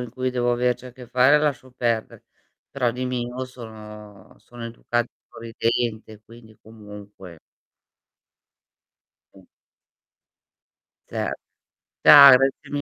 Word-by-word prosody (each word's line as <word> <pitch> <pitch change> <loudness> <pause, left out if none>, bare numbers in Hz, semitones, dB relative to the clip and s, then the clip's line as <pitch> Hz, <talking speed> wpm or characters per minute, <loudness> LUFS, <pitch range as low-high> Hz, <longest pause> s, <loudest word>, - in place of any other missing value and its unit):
in 125 - -6
cui 130 +1 -4
devo 120 -1 -1
averci 125 +1 -1
a 125 - -12
che 125 -1 -13
fare 130 +4 +3
lascio 140 -4 -2
perdere, 120 -3 -3 0.5
però 125 -3 -1
di 125 +2 -5
mio 125 0 -4
sono 105 -5 -13
sono 120 +2 -12
educata 120 +1 -3
e - - -27
sorridente, 115 -1 -4
quindi, 110 -1 -17
comunque 105 -5 -13 2.0
Mh. 95 -2 -19 1.6
Cer - - -3 0.7
Ciao, 140 -2 +10
grazie 135 0 -2
mi 145 0 -3
120 Hz, 110 wpm, -22 LUFS, 110-125 Hz, 2.0 s, Ciao